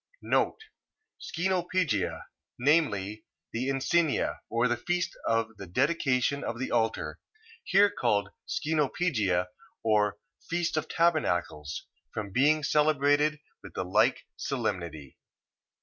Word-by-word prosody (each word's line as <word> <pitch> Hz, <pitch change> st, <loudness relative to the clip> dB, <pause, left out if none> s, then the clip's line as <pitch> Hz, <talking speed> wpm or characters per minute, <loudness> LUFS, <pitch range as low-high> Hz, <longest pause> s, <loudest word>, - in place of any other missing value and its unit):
Scenopegia... 175 Hz, -, 0 dB, 0.4 s
Viz., 110 Hz, -8 st, +2 dB, 0.3 s
the 125 Hz, +3 st, -1 dB
Encenia, 145 Hz, +4 st, +1 dB
or 120 Hz, +1 st, +2 dB
feast 175 Hz, +9 st, -1 dB
of 115 Hz, -1 st, 0 dB
the 100 Hz, -, -8 dB
dedication 135 Hz, -, +1 dB
of 115 Hz, -, -3 dB
the 130 Hz, -, -3 dB
altar, 115 Hz, -1 st, 0 dB, 0.8 s
called 100 Hz, -1 st, +2 dB, 0.2 s
here 160 Hz, +1 st, -1 dB
Scenopegia, 120 Hz, -, +1 dB, 0.4 s
or 105 Hz, -2 st, +2 dB, 0.3 s
feast 170 Hz, -1 st, 0 dB
of 155 Hz, -, -1 dB
tabernacles, 90 Hz, -, 0 dB, 0.3 s
from 105 Hz, -2 st, -4 dB
being 150 Hz, +7 st, +3 dB
celebrated 150 Hz, +1 st, +3 dB, 0.2 s
with -, -, -12 dB
the 95 Hz, -, -2 dB
like 90 Hz, -, +3 dB
solemnity. 80 Hz, -6 st, -4 dB
130 Hz, 100 wpm, -29 LUFS, 105-155 Hz, 0.8 s, being